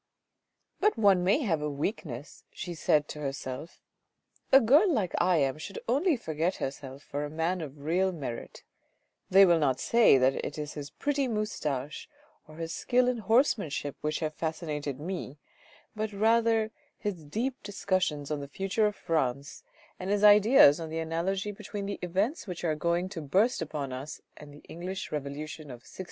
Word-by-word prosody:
" - - -52
But 425 - +3
one 200 -4 +4
may 200 +11 +3
have 165 -9 0
a 150 - -1
weakness," 145 - -5
she 175 - -6
said 150 -2 +2
to 150 - -7
herself, 135 +2 -6 0.3
" - - -39
a 270 - +9
girl 285 - +5
like 210 - 0
I 180 0 +3
am 140 0 +1
should 195 +6 -7
only 285 +6 +2
forget 165 -3 -1
herself 135 0 -6
for 145 +1 -4
a 145 - -4
man 165 +4 -1
of 145 -2 -8
real 185 +5 +1
merit; 135 -9 -7 0.7
they 195 +1 +8
will 170 -2 +4
not 135 -4 +1
say 230 - +5
that 130 +1 +2
it 150 - -5
is 150 -1 -5
his 145 -2 -7
pretty 285 - -1
moustache 155 - -3 0.4
or 155 - -13
his 165 0 -5
skill 250 0 +2
in 250 -2 0
horsemanship 205 - +1
which 155 +2 -2
have 155 -1 -2
fascinated 150 -4 -4
me, 165 -4 -5 0.6
but 215 0 -2
rather 225 +1 +2 0.3
his 195 -7 -4
deep 230 - -3
discussions 185 -8 -1
on 150 - -1
the 140 - -6
future 195 +8 0
of 210 - -3
France 140 -6 -2 0.4
and 185 - -4
his 205 0 +1
ideas 210 - +7
on 165 -1 -5
the 160 - -4
an 160 0 -4
alogy 195 +5 -1
between 205 0 -6
the 200 0 -4
events 195 - -1
which 180 -2 -6
are 160 -2 +1
going 170 +3 0
to 190 -5 -6
burst 190 - +2
upon 145 -4 -4
us 135 +4 -6 0.2
and 150 -1 -12
the 145 - -15
English 185 +3 -6
revolution 150 +2 -5
of 125 -4 -11
1688." - - -16
170 Hz, 180 wpm, -29 LUFS, 150-205 Hz, 0.7 s, a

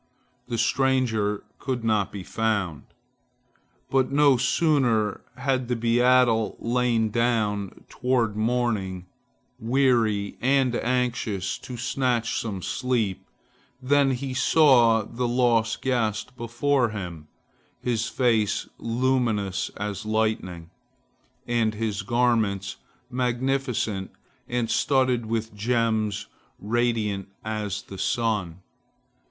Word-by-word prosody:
The 115 - -3
stranger 115 -4 +1 0.2
could 130 -3 -3
not 110 -3 +1
be 100 -2 -7
found. 100 -8 -1 1.1
But 130 -1 +2
no 140 -1 +5
sooner 120 - +1 0.2
had 130 -1 0
the 125 - 0
beadle 120 -1 +3
lain 120 -2 +1
down, 105 -4 0
toward 125 -4 0
morning, 110 -5 -1 0.5
weary 115 -5 +1
and 130 -1 +2
anxious, 120 -6 -1
to 125 - -8
snatch 120 -1 0
some 100 -5 -4
sleep, 120 -7 -1 0.5
than 140 +1 +3
he 130 0 -2
saw 125 -5 +5
the 120 +4 -3
lost 120 -2 +1
guest 120 -2 -1
before 120 +2 0
him, 90 -7 -7 0.5
his 120 -1 -1
face 110 -6 +1
luminous 115 -5 0
as 105 -1 -4
lightning, 110 -6 -2 0.7
and 115 -3 0
his 105 -1 -2
garments 115 -5 0 0.3
magnificent 125 -5 -1 0.4
and 120 -1 -1
studded 130 -4 +2
with 110 0 -2
gems 110 -2 0 0.3
radiant 110 -3 -1 0.2
as 105 -2 -3
the 95 - -10
sun. 95 -7 -1
115 Hz, 100 wpm, -25 LUFS, 105-125 Hz, 1.1 s, no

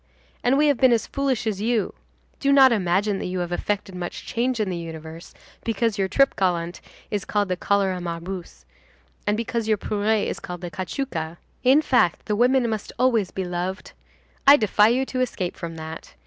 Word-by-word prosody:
And 250 +3 +3
we 300 - +4
have 285 -3 +3
been 260 -2 +6
as 230 -3 +2
foolish 275 -4 -1
as 205 -3 -2
you. 225 -1 0 0.5
Do 280 - +2
not 270 -2 +7
imagine 195 0 +1
that - - -3
you 185 +1 -3
have 175 -1 -3
effected 195 +2 -2
much 180 -1 -6
change 245 +1 -1
in 215 - +1
the - - -2
universe, 165 0 -8 0.3
because 225 -1 0
your 190 - +2
trip 275 +8 +3
gallant 175 -3 -1 0.3
is 205 -2 -1
called 205 -2 0
the 180 - +1
cholera 190 -1 0
morbus, 170 - -6 0.6
and 210 +1 +2
because 230 -1 -2
your 215 -1 +3
pourrée 210 +1 0
is - - -3
called 180 -1 -7
the 175 -1 -6
cachuca. 170 - -4 0.3
In 270 +5 +5
fact, 180 - +2
the 210 - 0
women 250 +2 +3
must 220 -2 -3
always 235 -6 +2
be 190 - -4
loved. 180 +2 -4 0.6
I 285 +1 +10
defy 210 -2 +4
you 250 +4 +2
to 255 -1 -2
escape 190 -8 -2
from 165 -1 -6
that. 160 - -8
205 Hz, 190 wpm, -24 LUFS, 180-240 Hz, 0.6 s, I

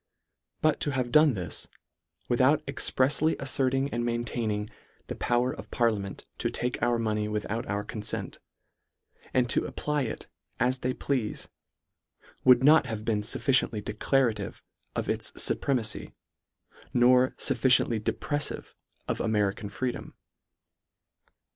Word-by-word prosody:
But 155 -1 +3
to 145 - -1
have 125 -2 -1
done 150 -2 +5
this, 90 -3 -4 0.6
without 135 +5 +3
exprefsly 140 +3 +1
afferting 135 0 +1
and 120 0 -1
maintaining 115 -3 -2 0.2
" - - -35
the - - -3
power 120 +1 +1
of - - -10
parliament 105 -5 -1
to - - 0
take 125 +1 -2
our 120 0 +2
mo 110 -2 0
ney 105 0 -1
without 105 +1 -3
our 100 +1 -2
confent," 105 0 -4 0.9
and 125 -1 +2
to - - +1
apply 150 -1 -2
it 110 - -6 0.3
as 125 +1 +1
they 125 +1 -1
pleafe, 125 -7 -2 0.9
would 125 0 +6
not 150 -1 +6
have 110 -2 -5
been 110 -2 +1
fufficiently 110 -2 +1
declarative 115 +2 0 0.3
of - - -2
its - - 0
fupremacy, 120 -6 0 0.8
nor 125 +1 +5
fufficiently 125 -3 +3
depreffive 145 +7 -2 0.3
of - - -1
American 105 -1 0
freedom. 125 +4 -4
120 Hz, 125 wpm, -28 LUFS, 110-130 Hz, 0.9 s, would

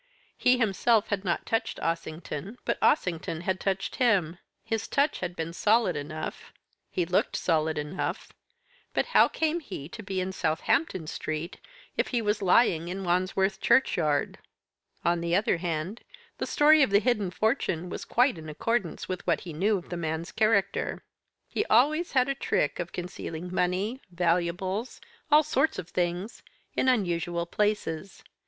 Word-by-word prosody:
He 250 0 +4
himself 225 0 +2
had 200 -2 -1
not 175 -3 -1
touched 225 0 -1
Ossington, 165 +4 -4
but - - 0
Ossington 165 - +1
had 185 +1 -1
touched 195 0 -2
him. 185 -9 +2 0.2
His 225 -1 -2
touch 285 +2 +1
had 180 -1 -4
been 165 0 -4
solid 215 0 +3
enough, 155 +2 -6 0.4
he 180 - -1
looked 180 +2 +1
solid 160 -2 +1
enough, 150 +5 -4 0.6
but - - +2
how - - +7
came 320 +1 0
he 185 - -7
to 225 - -8
be 190 -2 -3
in 185 +1 -2
Southampton 190 - 0
Street 155 +3 -4 0.4
if - - +1
he 245 - 0
was 210 -1 0
lying 180 -3 +4
in 190 +2 -4
Wandsworth 190 +2 +1
Churchyard? 155 - +2 0.7
On 170 0 +2
the 170 0 +1
other 200 -2 +2
hand, 170 +5 -3 0.4
the - - -2
story 305 +1 +5
of 270 - +4
the 200 - +5
hidden 215 -4 +1
fortune 185 - 0
was - - -5
quite 245 -7 +2
in 155 -1 -8
accordance 195 +4 -2
with 185 -1 -5
what - - +2
he 170 -3 -7
knew 200 +7 +2
of 180 - -10
the 175 - -4
man's 160 +1 -3
character. 215 -3 +1 0.4
He - - -1
always 305 - +3
had 255 -1 +4
a 275 - +1
trick 150 - 0
of 175 0 -4
concealing 180 -1 -6
money, 190 +9 0
valuables, 180 +5 -1 0.3
all 300 +1 +7
sorts 310 +1 +1
of 170 - -6
things, 180 +5 -2 0.3
in 260 - +3
unusual 175 -7 0
places. 195 -2 -2
185 Hz, 160 wpm, -28 LUFS, 170-225 Hz, 0.7 s, how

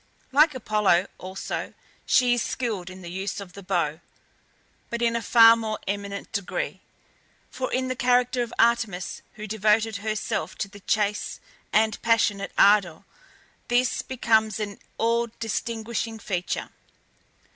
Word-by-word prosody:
Like 300 +2 +5
Apollo 210 -6 +2
also, 190 +1 -5 0.3
she 250 -2 +4
is 240 - +1
skilled 215 -9 -3
in 185 0 -11
the 170 - -7
use 190 +2 -3
of 190 -3 -9
the 200 - -10
bow, 170 -5 -1 0.9
but 235 - -3
in 235 -1 +1
a 235 - 0
far 230 +1 +7
more 220 -2 -3
eminent 200 0 -4
degree, 200 -3 -3 0.7
for 255 0 -3
in 260 0 0
the 255 - -2
character 250 0 +2
of 235 - -3
Artemis, 225 -6 +1
who 215 - -8
devoted 215 +1 +2
herself 215 +1 -3
to 200 - -2
the 205 +1 -13
chase 210 0 -1 0.3
with 215 0 +2
passionate 225 -3 +2
ardour, 195 -5 +4 0.6
this 245 0 +2
becomes 220 -4 +1
an 205 -2 -4 0.2
all 235 +1 +1
distinguishing 225 0 -3
feature. 185 -5 -3
220 Hz, 135 wpm, -25 LUFS, 200-235 Hz, 0.9 s, far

